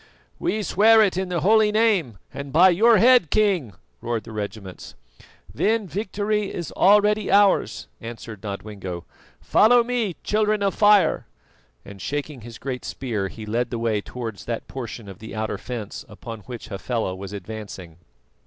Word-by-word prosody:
"We 220 -11 -1
swear 220 +4 +5
it 195 -4 +1
in 190 0 -2
the 175 -2 -1
holy 215 +2 +4
Name, 205 - +2 0.2
and 140 -1 -7
by 175 +6 +6
your 220 +6 +5
head, 245 - +5
King," 185 - +1 0.3
roared 115 -2 -2
the - - -11
regiments. 105 -3 -7 0.6
"Then 220 -1 +1
victory 205 +1 -2
is 170 - -5
already 210 +2 +4
ours," 200 - +3
answered 115 -3 -8
Nodwengo. 100 -4 -6 0.4
"Follow 240 +2 +5
me, 230 -7 -1
Children 215 -1 +1
of 195 - +1
Fire!" 205 -2 +4 0.6
and 100 -1 -11
shaking 145 -2 -4
his 115 +1 -10
great 130 -2 -5
spear, 110 -7 -3
he 110 +3 -9
led 115 +3 -1
the 120 - -3
way 115 -3 0
towards 115 -3 -7
that 115 -1 -4
portion 120 -4 -7
of 95 -2 -10
the 110 - -9
outer 110 +1 -3
fence 115 -5 -6
upon 115 +1 -9
which 120 -2 -8
Hafela 110 0 -3
was 95 +1 -8
advancing. 100 -4 -8
130 Hz, 155 wpm, -23 LUFS, -, 0.6 s, by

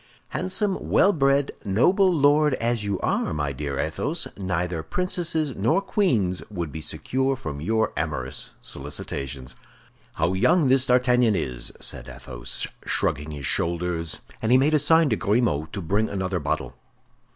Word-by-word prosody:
"Handsome, 185 +1 -1
well 200 - +5
bred, 140 -1 +2
noble 180 - +3
lord 150 -2 +4
as 115 -2 -1
you 100 -2 -2
are, - - 0
my 75 -2 -1
dear 70 0 -4
Athos, 145 - -2
neither 90 -3 -2
princesses 160 - -1
nor 115 - +2
queens 130 - +1
would 85 -7 -4
be 80 - -6
secure 130 - 0
from 75 - -6
your 110 +6 0
amorous - - -3
solicitations." 65 -1 -5 0.6
"How 80 +3 +1
young 150 - +3
this 130 0 +4
D'Artagnan 125 -3 +3
is!" 60 -8 -2
said 60 +1 -2
Athos, - - -4 0.2
shrugging 75 +3 0
his 75 -3 -6
shoulders; 85 0 -1 0.2
and 110 - 0
he 125 - +7
made 145 +4 +3
a 155 - +5
sign 160 +2 +5
to - - +4
Grimaud 100 -6 0
to 100 - -4
bring 100 +6 0
another 95 -2 -2
bottle. 75 - -2
105 Hz, 150 wpm, -24 LUFS, -, 0.6 s, he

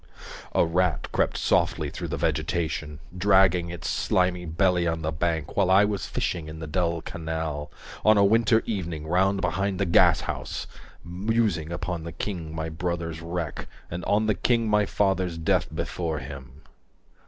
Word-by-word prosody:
A - - +5
rat 90 +1 0
crept - - +1
softly - - +1
through - - -5
the - - -3
vegetation 80 -3 -1 0.2
Dragging 95 -2 +4
its 85 -2 -6
slimy 90 -1 +1
belly 90 +1 +2
on 80 -1 -1
the 80 - -1
bank 80 -1 -2
While 95 -2 +3
I 95 +2 +6
was 100 -3 -2
fishing 85 -3 -2
in 80 - -8
the 80 - -6
dull 85 +1 -1
canal 80 -2 -4 0.3
On 110 0 +6
a 100 - +6
winter 110 +2 +4
evening 85 -8 -3
round 95 +4 +2
behind 95 0 0
the 100 - +2
gashouse. 85 - +2 0.4
190 - - -18 0.3
Musing 85 -9 +1
upon 90 -1 -3
the 85 - -6
king 85 -6 -4
my 80 0 -3
brother's 85 0 -3
wreck 85 -2 -4 0.2
And 85 +1 -4
on 105 +2 +2
the 110 - +3
king 115 +1 +1
my 105 -1 +3
father's 95 -4 0
death 80 - +1
before 80 -3 -3
him. 65 +2 -9
85 Hz, 165 wpm, -26 LUFS, 80-95 Hz, 0.4 s, I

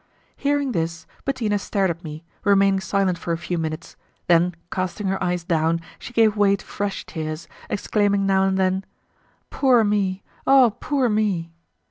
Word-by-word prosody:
Hearing 285 -1 0
this, 165 -4 -2 0.2
Bettina 225 -7 0
stared 195 -2 0
at 170 +2 -8
me, 155 0 -8 0.2
remaining 195 -1 +4
silent 190 -1 0
for 170 - -2
a - - -1
few 175 0 -3
minutes, 155 -1 -5 0.3
then 175 0 +3 0.2
casting 185 +2 -3
her 195 0 -1
eyes 180 -1 -1
down 165 -1 +1 0.2
she - - -9
gave 225 -3 +3
way 200 -1 +4
to 195 - -11
fresh 200 -1 -4
tears, 155 0 -5 0.2
exclaiming 200 -1 +1
now 190 0 +3
and 190 0 +1
then: 190 0 +1 0.7
"Poor 255 -4 +4
me! 200 -2 0 0.2
oh, 260 -5 +6
poor 275 -4 +1
me!" 205 -7 0
195 Hz, 160 wpm, -23 LUFS, 170-210 Hz, 0.7 s, oh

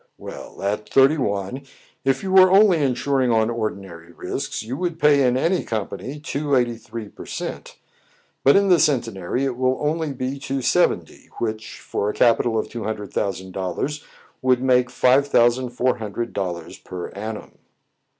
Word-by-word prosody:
"Well, - - -9
at 105 +2 -2
thirty 135 +3 +4
one, 100 +2 -2 0.4
if 135 +3 +1
you 190 - -3
were 185 -1 +7
only 190 -4 +5
insuring 130 0 +1
on 110 0 +2
ordinary 95 -7 -5
risks, 85 - -4
you 120 +4 -5
would 175 -1 -2
pay 150 -2 +4
in 125 +1 +2
any 170 +7 +1
company 110 +6 -5
two 145 -1 -1
eighty 120 -2 +1
three 115 -1 -8
per - - -12
cent; - - -6 0.7
but 140 - +6
in 200 0 +4
the 175 -2 +6
Centenary 125 - 0
it 130 -2 -2
will 130 0 +1
only 155 +1 -1
be 130 +1 -4
two 135 -1 -3
seventy, - - 0
which, 110 -1 -4
for 100 - -2
a - - -2
capital 115 -1 +3
of 110 - -1
two 115 +1 -6
hundred 105 -2 -5
thousand 95 -2 -2
dollars, 95 - -3 0.4
would 130 -2 +3
make 125 -1 +3
five 130 +3 +3
thousand 120 -1 +3
four 125 +1 0
hundred 115 +2 -4
dollars 90 -4 -4
per 90 -1 -7
annum." 105 +2 -7
125 Hz, 170 wpm, -22 LUFS, 110-140 Hz, 0.7 s, were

